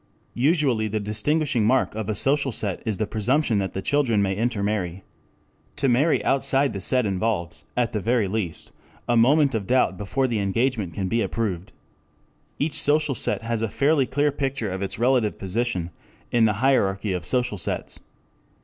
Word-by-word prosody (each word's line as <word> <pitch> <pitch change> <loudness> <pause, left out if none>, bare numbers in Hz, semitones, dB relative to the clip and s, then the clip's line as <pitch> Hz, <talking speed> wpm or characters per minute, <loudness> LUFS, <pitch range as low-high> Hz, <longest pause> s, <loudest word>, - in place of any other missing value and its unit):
Usually 135 -5 +1
the 110 +1 -2
distinguishing 120 +5 0
mark 125 +5 +2
of 110 -1 -4
a 110 - -1
social 140 +4 +2
set 105 -4 -2
is 105 -3 0
the 110 - 0
presumption 115 +2 +1
that 95 -2 -3
the 95 - -4
children 135 -7 +2
may 95 -1 +1
intermarry. 100 -5 -2 0.7
To 140 - 0
marry 135 +6 +2
outside 135 -1 +2
the 100 - -5
set 125 +2 +1
involves, 90 -6 -2
at 120 -2 +1
the 105 - -2
very 115 0 +1
least, 95 -4 -4 0.4
a 120 - +2
moment 135 +4 +4
of 100 -4 -2
doubt 125 -7 +2
before 130 +7 -1
the 120 -4 -1
engagement 105 -3 -1
can 95 - -2
be 115 +5 0
approved. 100 -6 -3 0.9
Each 145 +1 0
social 150 -1 +2
set 115 - -2
has 115 -1 -2
a 115 - -1
fairly 140 +2 +2
clear 145 +1 +1
picture 135 -7 -2
of 95 +1 -4
its 100 - -3
relative 120 -2 +1
position 95 -3 -2 0.4
in 115 -2 +4
the 105 - +2
hierarchy 100 -6 +2
of 90 -1 -3
social 120 +1 0
sets. - - -4
115 Hz, 175 wpm, -24 LUFS, 100-135 Hz, 0.9 s, moment